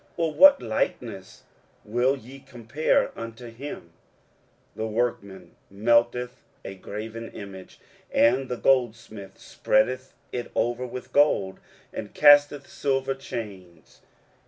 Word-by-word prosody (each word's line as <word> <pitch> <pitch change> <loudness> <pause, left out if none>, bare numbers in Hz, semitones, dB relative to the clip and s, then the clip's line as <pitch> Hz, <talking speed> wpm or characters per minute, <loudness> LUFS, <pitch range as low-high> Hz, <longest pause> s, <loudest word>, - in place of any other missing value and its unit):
or 165 -2 0
what 285 - +8
likeness - - -4 0.4
will 120 +5 +1
ye 130 +3 -13
compare 130 +2 -1
unto 115 +1 -8
him? 115 - -9 0.8
23:040:019 - - -25
The 110 - -2
workman 110 -4 -3
melteth 120 +4 +1 0.2
a 95 - -6
graven 110 +4 -7
image, 95 -2 -10 0.3
and 130 +3 +3
the 125 - -3
goldsmith 110 -6 -1
spreadeth 130 +5 0 0.2
it 120 -1 -5
over 120 +2 -1
with 125 +1 -9
gold, 100 -10 +2 0.3
and 105 - -7
casteth 145 -1 +5
silver 135 -1 -1
chains. 100 -10 -9
120 Hz, 110 wpm, -25 LUFS, 105-135 Hz, 0.8 s, what